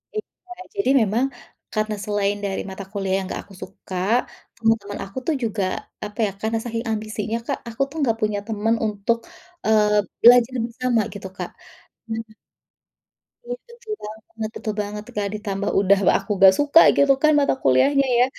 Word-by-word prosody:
Iya, 400 -3 -8 0.2
jadi 400 -8 0
memang 220 +4 +2 0.5
karena 215 -1 -1
selain 205 -1 0
dari 195 -1 -2
mata 190 +1 -7
kuliah 195 -2 -2
yang 195 - -3
enggak - - -4
aku 200 - -16
suka, 185 0 -10 0.6
teman-teman 225 -3 0
aku 195 +6 -13
tuh 320 - +2
juga 215 -3 -1 0.4
apa 210 +1 -10
ya, 200 - -1
karena 225 +1 0
saking 230 0 -4
ambisinya, 215 +1 -2
Kak, 280 - -1
aku 230 +4 -6
tuh 315 - -10
enggak 230 -6 +1
punya 210 -1 0
teman 225 +1 +1
untuk, 210 +2 0 0.5
eee, 210 -1 +4 0.3
belajar 245 +1 +7
bersama 235 0 0
gitu, 200 -2 -7
Kak. - - -4 0.6
Nah 225 - -2 1.3
Iya, - - -3 0.2
betul 470 -2 -7
banget 220 +1 -7
betul 215 -2 -3
banget 210 +1 -5
tuh, - - -13
Kak, 200 -1 0
ditambah 200 -1 -3
udah 200 0 +4
w - - +8
aku 200 +2 -6
enggak 190 0 +8
suka 290 +3 +6 0.2
gitu 280 -1 +6
kan 310 - +6
mata 285 - +3
kuliahnya 275 - +4
ya. 250 - +6
220 Hz, 170 wpm, -22 LUFS, 205-240 Hz, 1.3 s, w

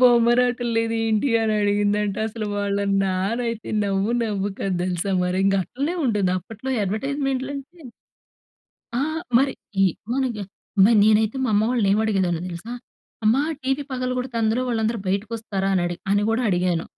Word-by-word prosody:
బొమ్మరాటం 245 0 +4
లేదేంటి 225 +1 +1
అనడిగిందంట. 205 -1 +1
అసలు 215 0 -5
వాళ్ళ 200 0 0 0.2
నాన్న 195 +5 0
అయితే 230 -1 -5 0.2
నవ్వు 200 +2 0
నవ్వు 205 -2 -1
కాదు 190 -2 -1
తెలుసా? 185 +2 -1
మరి 180 +1 0
ఇంక 195 0 +3
అట్లనే 285 - -3
ఉంటుంది 205 -7 +1
అప్పట్లో 225 +8 -7
అడ్వర్టైజ్మెంట్‌లంటే 275 - -3 1.2
ఆ! - - +1 0.4
మరి 270 +1 +2 0.3
ఈ - - +6 0.3
మన 265 +1 +1 0.2
ఎన్ 195 - -6 0.4
మరి 225 +2 +5
నేనైతే 215 +2 +3
మా 255 - 0
అమ్మ 210 +1 +3
వాళ్ళనేమడిగేదాన్నో 200 -6 +1
తెలుసా? 175 +7 -7 0.5
అమ్మా 235 +7 +4 0.2
టీవీ 270 +2 0
పగలడితే 250 -1 -2
అందులో 220 +3 +1
వాళ్ళందరూ 225 -1 0
బయటకొస్తారా? 200 -1 -2
అనడి 175 -1 0
అని 205 +1 +3
కూడా 230 +3 +1
అడిగాను. 175 -2 0
220 Hz, 135 wpm, -23 LUFS, 195-245 Hz, 1.2 s, ఈ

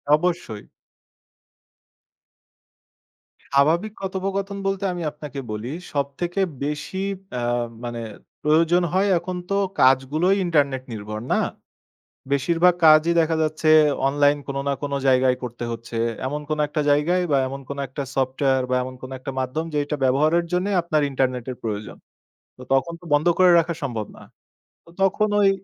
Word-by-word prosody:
অবশ্যই। 155 -11 -2 2.8
স্বাভাবিক 165 +10 +2
কথোপকথন 195 +1 -3
বলতে 195 0 -1
আমি 175 - -5
আপনাকে 150 -2 -8
বলি। 105 +3 -4 0.2
সবথেকে 150 +7 -2 0.2
বেশি 150 +5 -4 0.4
অ্যা 125 -1 -2 0.4
মানে 120 -1 -4 0.4
প্রয়োজন 165 +3 +3
হয় 195 +2 +2
এখন 180 +1 -5
তো - - 0 0.3
কাজগুলোই 140 +9 +3
ইন্টারনেট 140 -6 +1
নির্ভর, 105 0 -6
না? - - +3 1.0
বেশিরভাগ 170 +6 +3
কাজই 155 +2 +7
দেখা 160 0 +1
যাচ্ছে 155 0 -1 0.4
অনলাইন 145 +1 +3
কোন 140 - -4
না - - +2
কোন 140 -1 -3 0.2
জায়গায় 130 0 +4
করতে 120 -1 -5
হচ্ছে। 115 0 -7 0.3
এমন 150 +2 -3
কোন 155 - -1
একটা 150 - -2
জায়গায় 165 +6 +2
বা 140 - +4
এমন 135 +1 -6
কোনো 140 0 -5
একটা 140 +2 -5
সফটওয়্যার 130 0 +1
বা - - +2
এমন 130 0 -6
কোনো 130 +1 -8
একটা 135 +1 -6
মাধ্যম 130 +5 -2
যেইটা 145 0 -1
ব্যবহারের 155 +6 +3
জন্যে 180 +3 0
আপনার 155 -3 +1
ইন্টারনেট 130 -2 -1
এর 125 - -6
প্রয়োজন। 105 -2 -4 0.6
তো - - -13
তখন 170 +5 +1
তো - - -14
বন্ধ 150 +4 +3
করে 185 -1 +7
রাখা 170 +1 -1
সম্ভব 115 -6 -3
না। - - -13 0.6
তো - - -18
তখন 205 +2 +2
ওই 195 - +5
145 Hz, 145 wpm, -23 LUFS, 130-170 Hz, 2.8 s, কাজই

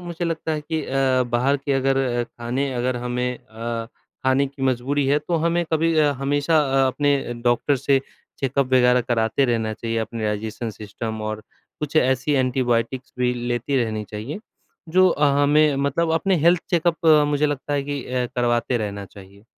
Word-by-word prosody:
मुझे 175 -1 -5
लगता 160 -1 -2
है 155 - -2
कि 155 +1 -3
अ, 130 -1 +1
बाहर 135 +4 +2
के 140 +1 -3
अगर 135 0 +2 0.3
ख़ाने 125 +4 -3
अगर 125 +1 -1
हमें 125 0 -1
अ, 115 +1 -5 0.4
ख़ाने 130 +1 +3
की 135 0 -10
मजबूरी 135 +2 0
है 145 +2 +3
तो 165 +3 -2
हमें 170 +1 +1
कभी 160 0 +2 0.2
हमेशा 145 +3 +2
अ, 135 -2 +2
अपने 140 -1 0
डॉक्टर 120 +4 +2
से 135 +1 +2 0.4
चेकअप 135 0 0
वग़ैरह 125 -1 +5
कराते 115 +1 +1
रहना 115 -3 0
चाहिए। 115 0 -4
अपने 110 0 -4
डाइजेशन 110 +2 -3
सिस्टम 110 +1 -6
और 110 0 -4 0.4
कुछ 150 +1 -3
ऐसी 130 +1 +2
एंटीबायोटिक्स 125 0 -1
भी 125 0 +2
लेती 120 +3 -2
रहनी 110 -1 -4
चाहिए। 110 - -5 0.5
जो 185 +3 +5
अ, 150 -3 +1 0.2
हमें 150 0 +4
मतलब 140 +4 0
अपने 185 +3 +2
हेल्थ 175 0 +4
चेकअप 170 -1 +1 0.2
मुझे 145 +1 +2
लगता 145 0 -3
है 145 -1 +1
कि 140 -1 -4
अ, 125 -1 -1
करवाते 120 0 +1
रहना 100 -2 -4
चाहिए। 100 +1 -15
130 Hz, 170 wpm, -22 LUFS, 120-145 Hz, 0.5 s, वग़ैरह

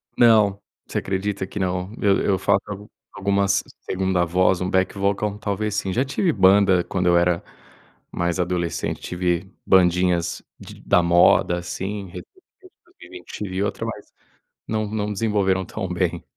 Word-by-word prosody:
Não, 110 -4 +4 0.3
você - - -4
acredita 95 0 -3
que - - -9
não, 90 0 -2
eu 100 -1 +3
eu 95 -2 +2
faço 95 - +2 0.5
algumas 100 0 +1 0.2
segunda 95 -1 0
voz, 90 +1 +2
um 90 - -1
back 95 +1 +1
vocal, 100 +1 -1
talvez 105 0 -2
sim, 95 -2 -1
já 130 +4 +1
tive 165 +6 0
banda 95 -4 +4
quando 90 0 -2
eu 85 0 +5
era 85 0 +1 0.7
mais 85 +1 -2
adolescente, 90 -2 -2
tive 90 +1 -2
bandinhas 90 -2 +2 0.2
de - - -12
da 90 - +3
moda, 85 0 +4
assim, 95 +3 -5
recentemente 90 - -11 0.7
eu 365 - -11 0.2
tive 95 0 -2
outra 100 - -3
mas - - -8 0.5
não 110 -1 -1
não 105 0 -3
desenvolveram 100 -3 0
tão - - -5
bem. - - -2
95 Hz, 145 wpm, -22 LUFS, 90-100 Hz, 0.7 s, eu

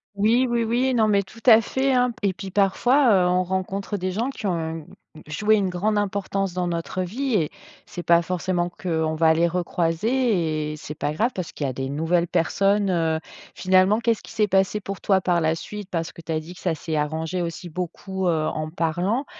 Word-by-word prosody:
Oui, 225 +5 +3
oui, 240 -1 +1
oui. 245 +3 +1
Non 225 -3 +3
mais 200 -2 +3
tout 205 +4 -15
à 225 -2 +9
fait, 265 +4 0
hein. 250 -1 +3
P 225 -3 -2
et - - -3
puis 190 +1 -8
parfois, 240 +7 +3
heu, - - +3
on 180 +1 +2
rencontre 190 +2 -3
des 185 0 -2
gens 230 +7 -1
qui 270 - -7
ont 165 -4 -2 0.4
joué 210 +9 +2
une 200 -3 +1
grande 205 +4 0
importance 195 -2 -1
dans 180 0 -1
notre 170 +2 -3
vie 250 +8 -3
et 160 -7 +1 0.4
c'est 175 - -7
pas 170 0 +5
forcément 175 0 -1
qu'on 160 -3 -2
va 160 0 +4
les 170 +2 +2
recroiser 170 -1 0
et - - -6
c'est 150 0 -8
pas 150 -1 -2
grave 225 +10 +1
parce 185 -3 -5
qu'il 145 - -4
y - - 0
a - - -4
des 135 +1 -4
nouvelles 165 +4 +1
personnes, 195 +4 +1
heu 165 -2 +1 0.4
finalement 185 +3 +3
qu'est-ce 230 -2 0
qui - - -12
s'est 210 -1 +1
passé 195 +1 +2
pour 195 -1 -6
toi 195 -2 +3
par 175 -2 +1
la 160 0 +2
suite? 205 +4 -8
Parce 165 -2 -3
que - - -12
tu 165 - -6
as 160 - 0
dit 160 +3 -10
que 175 - -15
ça 175 -3 0
s'est 160 +1 -4
arrangé 160 +4 -2
aussi 175 +1 -5
beaucoup, 185 +2 -4
heu, 160 -3 +1
en 155 0 -3
parlant. 175 - -1
185 Hz, 220 wpm, -23 LUFS, 165-210 Hz, 0.4 s, à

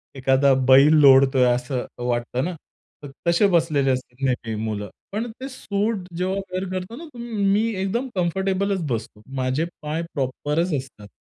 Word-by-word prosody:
एखादा 135 +1 +3
बैल 135 +4 +7
लोळतोय 135 -1 +6
असं 125 +1 -3 0.2
वाटतं 120 +1 -1
ना, 180 - -3 0.5
तर 145 - -8 0.2
तसे 170 +4 +4
बसलेले 160 -7 +2
असतील 130 +1 -4
नेहमी 115 -3 -2
मुलं. 105 -2 -3 0.2
पण 225 +3 -3
ते 270 - -5
सूट 215 -3 -2 0.2
जेव्हा 185 +2 -1 0.2
वेअर 185 +1 -2
करतो 185 +5 -5
ना, 330 +6 -9
तुम्ही 240 -1 -8 0.2
मी 220 +3 +2
एकदम 235 +7 -1
कम्फर्टेबलचं 190 +1 0
बसतो. 110 -3 -4
माझे 130 +4 0 0.2
पाय 155 +2 -3
प्रॉपरचं 150 +4 -1
असतात. 130 -6 -9
150 Hz, 150 wpm, -23 LUFS, 130-190 Hz, 0.5 s, बैल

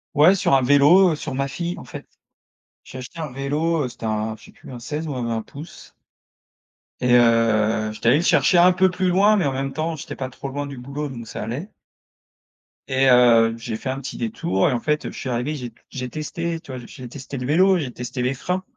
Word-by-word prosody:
Ouais 155 +6 +6
sur 185 - +1
un 135 - +4
vélo, 145 +8 +6
heu, - - -1
sur 140 -3 -5
ma 135 0 -1
fille 170 +4 -4
en - - -9
fait, - - -10 0.8
j'ai 130 - -11
acheté 130 +6 -9
un 155 -5 -4
vélo, 145 +3 -1
heu, - - -4
c'était 120 -1 -9
un 110 0 -2
je 110 - -19
sais - - -15
plus - - -16
un 125 - -8
16 150 +6 -5
ou 145 - -3
20 115 -3 -2
pouces 150 +4 -12 1.1
et 125 - +1
heu, 115 -2 +3
j'étais 110 +2 -4
allé - - +5
le - - -1
chercher 175 - +4
un 180 +1 +7
peu 185 +1 +3
plus 185 0 -1
loin 200 +4 +4
mais 185 -7 +1
en 140 - +1
même 135 +1 -3
temps 160 0 -2
j'étais - - -7
pas 130 -1 -5
trop 135 +2 -8
loin 145 +1 -4
du 140 -1 -8
boulot 140 +4 -5
donc 115 -3 -8
ça - - -6
allait 135 - -5 1.2
et 135 0 +2
heu, 115 -2 +5
j'ai 115 -1 -5
fait 130 - -5
un 130 +1 -3
petit 135 - -7
détour 180 -7 0
et - - 0
en 120 - 0
fait, 150 +4 -1
je - - -10
suis 130 - -5
arrivé 125 +5 -2
j'ai 125 -5 -7 0.2
j'ai 125 -1 -5
testé, 165 +3 -4
tu 140 - -12
vois? 130 - -6
J'ai 125 -2 -10
testé 135 +1 -8
le 125 0 -4
vélo, 185 +4 +4
j'ai 135 -6 -4
testé 125 +1 -5
les 125 +2 0
freins, 180 +7 -3
135 Hz, 235 wpm, -22 LUFS, 125-160 Hz, 1.2 s, un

